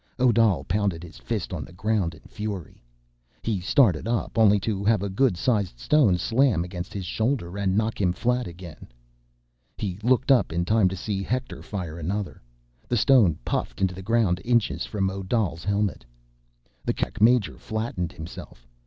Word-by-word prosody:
Odal 115 -5 +3
pounded 95 -3 -1
his 85 - -11
fist - - -3
on - - -3
the - - -12
ground 95 -3 -1
in 80 - -17
fury. 105 - -7 0.6
He 110 -4 -1
started 95 - +3
up, 115 -1 -1
only 105 -3 +5
to 100 -1 -2
have 105 -1 +2
a 100 - -2
good 110 -1 +2
sized 100 - 0
stone 120 - +3
slam 115 +1 +2
against 90 +1 -6
his 100 -3 -5
shoulder, 110 -2 -1
and 100 -1 0
knock 110 0 0
him 90 -2 +3
flat 125 +6 0
again. 85 -1 -10 0.9
He 95 -2 -4
looked 130 +4 +2
up 130 - +4
in 85 +1 -1
time 105 -1 +3
to 95 - -5
see 100 +1 -3
Hector 125 +5 -3
fire 85 -5 -5
another. 95 +4 -3 0.5
The 120 - 0
stone 110 - +5
puffed - - -2
into 95 -2 +1
the 95 - -8
ground 100 -4 +1
inches 120 -1 +1
from 95 -3 -1
Odal's 95 -3 -2
helmet. 100 -3 -1 0.8
The - - -1
Kerak - - -3
major 115 -1 +4
flattened 110 -6 -3
himself. 80 -6 -10
100 Hz, 170 wpm, -25 LUFS, 90-115 Hz, 0.9 s, only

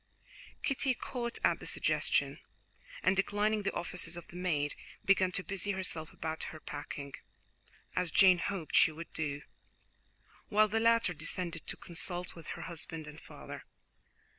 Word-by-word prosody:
Kitty 270 -2 +2
caught 235 -1 -3
at - - +4
the - - -8
suggestion, - - +2 0.6
and 190 - +4
declining 205 +2 +2
the 200 - -1
offices 175 -1 -2
of 175 - -8
the - - -12
maid, 155 -5 +1 0.3
began 190 -2 +5
to 185 - 0
busy 200 +1 -1
herself 165 -4 -2
about 160 0 -4
her 155 - -9
packing, 145 -2 -6 0.8
as 180 -1 +2
Jane 185 +1 +7
hoped 185 -4 -2
she - - +7
would 165 +2 -9
do, 150 -2 -2 1.1
while 215 -1 +5
the 220 +2 +1
latter 230 -4 +4
descended 165 +2 -3
to - - -3
consult 175 +1 -2
with 165 -1 -11
her - - -6
husband 165 -2 -2
and 150 0 -10
father. - - -9
180 Hz, 150 wpm, -33 LUFS, 160-200 Hz, 1.1 s, Jane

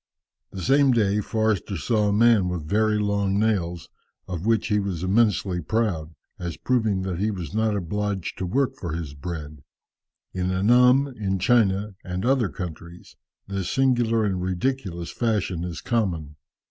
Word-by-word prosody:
The 95 - -7
same 135 - +4
day 105 -3 +2
Forster 110 -3 -1
saw 105 +5 +1
a - - +2
man 105 -3 +4
with 85 -4 -4
very 105 +3 +2
long 100 -1 0
nails, 95 -6 0 0.4
of 90 +2 -4
which 115 0 +2
he 105 -1 +2
was 95 -4 -3
immensely 100 -2 +2
proud, 85 -5 -1 0.2
as 85 -2 -5
proving 110 -7 0
that 90 -2 -3
he 105 +2 +1
was 90 -7 -5
not 110 -1 +1
obliged 100 0 -3
to 90 - -2
work 135 +6 0
for 85 -8 -5
his 80 -4 -5
bread. 75 -1 -7 0.7
In 90 0 -1
Annam, 125 +8 +5
in 95 -3 -1
China 105 0 +2
and 90 +2 -4
other 125 -5 +2
countries, 85 0 -8 0.3
this 95 -2 -3
singular 120 -4 +2
and 95 -3 -1
ridiculous 95 -2 -2
fashion 105 -7 -1
is 90 -2 -5
common. 85 -11 -1
100 Hz, 155 wpm, -24 LUFS, 90-110 Hz, 0.7 s, Annam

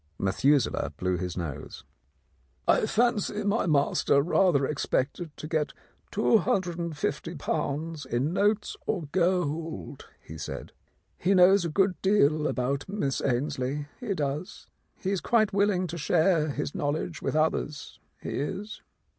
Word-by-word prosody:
Methuselah 135 +9 +2
blew 90 0 0
his 90 0 -4
nose. 80 -6 -6 0.8
"I - - +4
fancy 220 -3 +1
my 205 0 +1
master 140 -2 +3
rather 165 -4 +3
expected 150 +3 -1
to 155 - -6
get 155 -2 -1 0.4
^250 170 -6 -1
in 130 +7 0
notes 205 +2 +1
or 185 -6 0
gold," 165 - -1
he 80 0 -10
said. 75 - -6 0.5
"He 195 +3 +2
knows 185 0 +6
a - - -1
good 185 +2 +1
deal 155 -6 +3
about 140 +5 -1
Miss 165 -10 -1
Ainslie, 140 +2 -1
he 215 -6 -2
does. 150 +5 -3 0.3
He 190 - -2
is 195 - -1
quite 215 -4 +2
willing 200 -2 +2
to 170 -1 -5
share 160 0 +3
his 145 0 -3
knowledge 155 +2 -2
with - - -2
others, 155 -1 -1 0.2
he - - -4
is." 195 - -4
160 Hz, 130 wpm, -28 LUFS, 140-190 Hz, 0.8 s, knows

